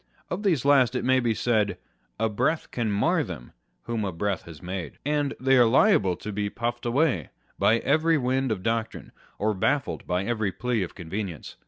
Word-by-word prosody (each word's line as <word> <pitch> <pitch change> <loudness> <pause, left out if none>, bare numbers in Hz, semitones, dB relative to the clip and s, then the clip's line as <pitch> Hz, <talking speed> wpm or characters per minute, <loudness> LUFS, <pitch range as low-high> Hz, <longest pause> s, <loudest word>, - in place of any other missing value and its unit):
Of 180 - -2
these 170 - +1
last 130 -4 +4
it - - -1
may 130 0 +4
be 120 -3 0
said, 105 -6 +1 0.4
A 110 - +2
breath 155 +9 -1
can 115 -3 -1
mar 160 - +2
them, 80 - -8 0.3
whom 115 -2 -2
a 100 - -2
breath 95 +2 -2
has 80 -3 -11
made: 90 -3 -6
and 145 -1 0
they 135 +1 +3
are 120 -2 +6
liable 115 - +4
to 105 - -7
be 100 0 -2
puffed 120 +2 -3
away 120 - +1 0.3
by 115 - +4
every 155 +6 +2
wind 130 -1 0
of 95 -4 -3
doctrine, 115 0 -2 0.3
or 110 +1 +1
baffled 135 +8 -1
by 90 +1 0
every 110 -2 -1
plea 125 +1 -1
of 90 - -5
convenience. 90 - -6
115 Hz, 190 wpm, -26 LUFS, 100-135 Hz, 0.4 s, are